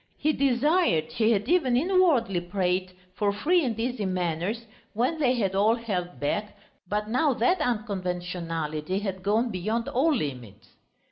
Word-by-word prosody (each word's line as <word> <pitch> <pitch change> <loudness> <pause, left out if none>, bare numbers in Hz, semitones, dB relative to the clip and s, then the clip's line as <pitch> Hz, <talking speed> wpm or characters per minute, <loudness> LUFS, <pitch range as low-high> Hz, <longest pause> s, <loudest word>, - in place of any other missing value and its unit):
He 310 +1 +1
desired, 275 - +2
he 225 -1 +2
had 210 -1 +1
even 305 -8 +3
inwardly 290 - +2
prayed 185 0 -1 0.2
for 200 +2 0
free 330 - +2
and 230 -4 -2
easy 235 -3 -1
manners, 185 +5 -2 0.3
when 255 +9 0
they 255 -4 +3
had 195 -6 0
all 210 +4 +3
held 190 -7 -4
back, 205 +9 -2 0.3
but 210 +1 -1
now 255 +4 +2
that 365 +6 +2
unconventionality 180 - -2
had 195 -2 -3
gone 220 +5 +1
beyond 215 +5 -2
all 285 +6 +2
limits. 125 - -5
210 Hz, 145 wpm, -26 LUFS, 180-250 Hz, 0.3 s, even